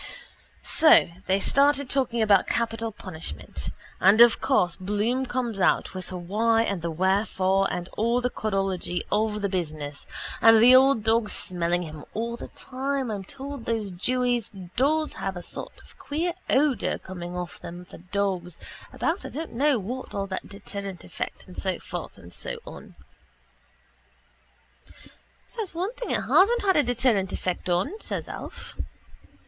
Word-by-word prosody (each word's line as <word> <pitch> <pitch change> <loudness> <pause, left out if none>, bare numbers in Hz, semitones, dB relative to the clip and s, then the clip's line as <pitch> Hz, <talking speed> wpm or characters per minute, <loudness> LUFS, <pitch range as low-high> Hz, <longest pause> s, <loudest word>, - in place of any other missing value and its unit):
So 315 - +6 0.2
they 190 +1 +3
started 280 +4 +3
talking 250 -4 +1
about 200 -3 +4
capital 225 -1 -1
punishment 160 - -7 0.3
and 200 +4 +6
of 235 -1 +7
course 180 -10 +2
Bloom 210 +7 -1
comes 240 -5 -2
out - - +2
with 185 -1 -6
the 185 - -6
why 225 +6 +2
and 200 -6 -2
the 170 - -2
wherefore 190 +2 +1
and 175 0 -3
all 235 +3 +1
the 250 0 -1
codology 195 -5 -1
of 210 0 +1
the - - +3
business 155 -6 -4 0.3
and 225 0 +8
the 245 +3 +8
old 265 -3 +5
dog 225 -1 +2
smelling 175 -2 -1
him 155 -2 -8
all 235 +2 -2
the - - -8
time 270 -1 -3
I'm 200 -2 -4
told 275 +4 -7
those 220 -4 -1
jewies 245 +5 0 0.2
does 310 +4 +2
have 190 -1 -4
a 175 - -7
sort - - -4
of - - -17
a - - -19
queer 330 +4 -1 0.2
odour 270 -5 +2
coming 180 -1 -7
off 175 -1 -5
them 175 +1 -8
for - - -13
dogs 185 -1 -2 0.3
about 335 +4 -1
I - - -6
don't 320 +4 -5
know 280 +3 +3
what 245 +6 -5
all 200 -1 -1
deterrent 200 0 -6
effect - - -6
and - - -13
so - - -1
forth - - -7
and - - -10
so - - -3
on. - - -11 2.6
—There's 430 -7 -4
one 370 +7 -2
thing - - -6
it - - +1
hasn't 405 -1 +4
a 300 - +6
deterrent 235 -6 +1
effect 180 0 -3
on, 220 - 0
says - - -3
Alf. - - -8
215 Hz, 155 wpm, -26 LUFS, 185-255 Hz, 2.6 s, and